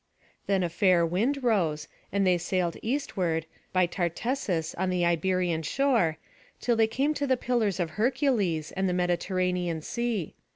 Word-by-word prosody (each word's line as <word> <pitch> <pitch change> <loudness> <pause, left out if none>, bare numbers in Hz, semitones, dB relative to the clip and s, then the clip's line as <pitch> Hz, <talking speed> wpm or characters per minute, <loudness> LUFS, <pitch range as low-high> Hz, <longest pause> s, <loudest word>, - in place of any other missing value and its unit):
Then 195 -2 +2
a 175 - 0
fair 175 0 +3
wind 235 - 0
rose, 165 -10 +1 0.2
and 200 0 +1
they 180 -1 +3
sailed 175 -1 -1
eastward, 190 - -1 0.3
by 185 -1 +3
Tartessus 175 - -2
on 190 - -1
the 180 -1 +1
Iberian 175 0 +1
shore, 205 - +1 0.4
till 240 - +1
they 225 -1 +4
came 270 +7 0
to 285 -1 -2
the 260 -1 +3
Pillars 230 -6 0
of 170 -3 -1
Hercules, 215 - 0
and 190 0 -1
the - - 0
Mediterranean 180 -1 0
Sea. 235 -6 -2
185 Hz, 155 wpm, -28 LUFS, 170-230 Hz, 0.4 s, they